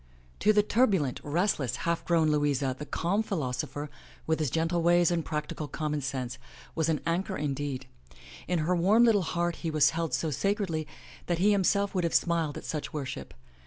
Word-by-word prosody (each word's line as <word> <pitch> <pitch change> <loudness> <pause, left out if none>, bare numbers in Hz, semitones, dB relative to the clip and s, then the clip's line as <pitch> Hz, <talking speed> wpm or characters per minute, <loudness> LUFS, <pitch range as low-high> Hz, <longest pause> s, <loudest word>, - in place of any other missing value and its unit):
To 215 - +4
the 210 -1 +4
turbulent, 200 - +2
restless, 150 - 0
half 170 0 0
grown 165 -3 +3
Louisa 145 -3 +1
the 150 - -6
calm 195 +6 0
philos 145 -13 -2
opher, 145 +1 -6 0.4
with 160 0 0
his 155 -4 0
gentle 165 +4 0
ways 175 0 +4
and 170 -2 0
practical 150 0 -4
common 150 0 -2
sense, 130 -1 -4 0.3
was 160 -1 0
an 155 - 0
anchor 185 +4 -1
indeed. 140 -2 -3 0.6
In 180 - +1
her 180 +2 +2
warm 200 +7 +4
little 225 -4 +5
heart 175 0 -1
he 165 - -3
was 155 -2 +4
held 165 -1 -1
so 160 - -1
sacredly 175 - -1 0.4
that 175 - +1
he 200 +5 +4
himself 200 0 +2
would 185 -2 0
have 170 - 0
smiled 165 -4 +1
at - - -8
such 150 -2 -4
worship. 140 -3 -5
165 Hz, 185 wpm, -29 LUFS, 145-180 Hz, 0.6 s, little